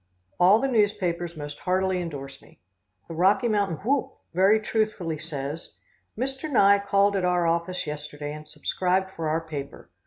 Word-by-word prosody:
All 185 +4 +7
the 270 - 0
newspapers 180 -8 0
most 145 -1 -7
heartily 185 0 0
indorse 140 -5 -7
me. - - -20 0.5
The 165 - -7
Rocky 190 +8 +3
Mountain 200 -6 -1
Whoop 275 +2 0 0.2
very 195 +5 +5
truthfully 210 -7 -1
says: 150 0 -6 0.4
"Mr. 270 +5 -2
Nye 200 -5 +6
called 200 0 +2
at 190 - 0
our 180 -1 +2
office 170 +2 0
yesterday 150 0 -6
and 150 0 -10
subscribed 185 +5 -1
for 165 -4 -3
our 160 +2 0
paper. 145 -4 -8
180 Hz, 155 wpm, -26 LUFS, 155-200 Hz, 0.5 s, All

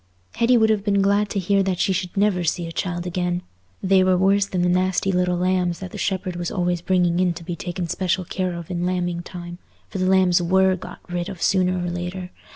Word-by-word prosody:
Hetty 240 +1 +4
would 220 -1 +4
have 210 -2 0
been 200 -1 +2
glad 200 +1 +2
to - - -3
hear 195 +1 +2
that 190 -2 0
she 190 - +1
should 180 +1 -3
never 195 -3 +2
see 170 +1 -1
a 165 - -6
child 175 0 -3
again; 180 0 -2 0.4
they 190 0 +4
were 185 -1 +3
worse 195 +2 +3
than 180 -3 -1
the - - +2
nasty 185 +2 +1
little 180 -1 +1
lambs 180 -1 +1
that 185 -2 -8
the - - -7
shepherd 185 -2 -2
was 175 -1 -3
always 175 -2 -1
bringing 175 -1 +2
in 180 -2 +2
to 170 - -8
be 175 0 -4
taken 175 +1 -4
special 185 +2 -1
care 185 0 -2
of 170 +1 -7
in 175 -1 -2
lambing 175 -1 -1
time; 175 0 -8 0.3
for 190 - -5
the 185 - +1
lambs 185 -2 +4
were 190 +2 +3
got 185 - -11
rid 175 -1 -3
of 190 - -8
sooner 185 -1 +2
or 175 - -2
later. 180 +1 -5
180 Hz, 235 wpm, -22 LUFS, 175-190 Hz, 0.4 s, Hetty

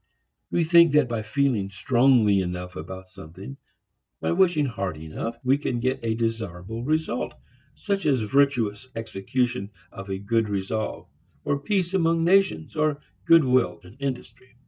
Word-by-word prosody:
We 170 - +1
think 170 -1 +6
that 150 -3 +4
by 115 -2 -2
feeling 110 -3 0
strongly 120 -1 +3
enough 90 0 -4
about 95 +4 -8
something, 95 - -11 0.6
by - - -1
wishing 175 -4 +3
hard 100 - -3
enough, 80 +9 -5
we 135 +2 +3
can 125 -4 -2
get 130 +2 0
a 110 -1 0
desirable 110 -2 -3
result, 155 -3 -1 0.4
such 200 -4 -2
as 135 -5 +2
virtuous 125 -2 +1
execution 115 0 -2 0.2
of 95 +1 -9
a 95 - -2
good 110 +2 0
resolve, 100 +2 -3 0.4
or 140 - 0
peace 185 +2 -1
among 165 -3 +2
nations, 175 - +2
or 155 -2 +1 0.3
good 165 -1 +7
will 130 -1 +2
in 90 - -14
industry. 130 -2 -6
120 Hz, 145 wpm, -25 LUFS, 100-145 Hz, 0.6 s, good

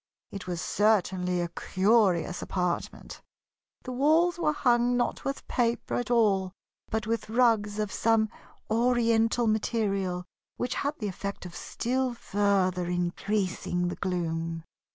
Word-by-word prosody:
It 195 -2 -7
was 175 -2 -3
certainly 185 -3 +1
a 175 - -1
curious 185 -1 +2
apartment. 180 -2 -3 0.6
The 255 - -6
walls 320 +7 +3
were 300 - +2
hung 245 -4 +2
not 240 - -1
with 275 0 -4
paper 235 -2 0
at 245 - -1
all, 200 -6 +2 0.4
but 220 -1 -1
with 225 0 -2
rugs 220 -3 +2
of 210 -2 -2
some 225 -1 +2 0.4
Oriental 230 0 +2
material 200 -5 0 0.3
which 250 +1 -2
had 285 +1 -2
the 210 - -3
effect 200 0 -5
of 175 -1 -9
still 255 +1 -2
further 190 -4 +1
increasing 180 0 -1
the - - -4
gloom. 165 -3 -2
210 Hz, 130 wpm, -28 LUFS, 180-240 Hz, 0.6 s, walls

